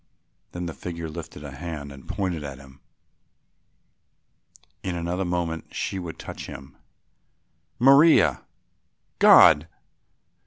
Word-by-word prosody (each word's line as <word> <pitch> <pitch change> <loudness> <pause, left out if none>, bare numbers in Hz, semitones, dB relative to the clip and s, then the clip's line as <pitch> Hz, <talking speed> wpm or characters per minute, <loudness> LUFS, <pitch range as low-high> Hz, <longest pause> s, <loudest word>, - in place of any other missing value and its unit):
Then 90 0 -5
the 85 - -5
figure 85 +3 -6
lifted 80 -1 -9
a 70 - -8
hand 75 -1 -7
and 70 -1 -13
pointed 90 -6 -3
at 70 -2 -7
him. 65 0 -16 2.0
In 90 -2 -4
another 85 +3 -2
moment 85 -2 -3
she 95 - -3
would 85 -3 -7
touch - - -8
him. 65 +1 -11 1.0
"Maria! 140 +6 +5 0.8
God!" 75 +2 +7
85 Hz, 110 wpm, -24 LUFS, 70-90 Hz, 2.0 s, God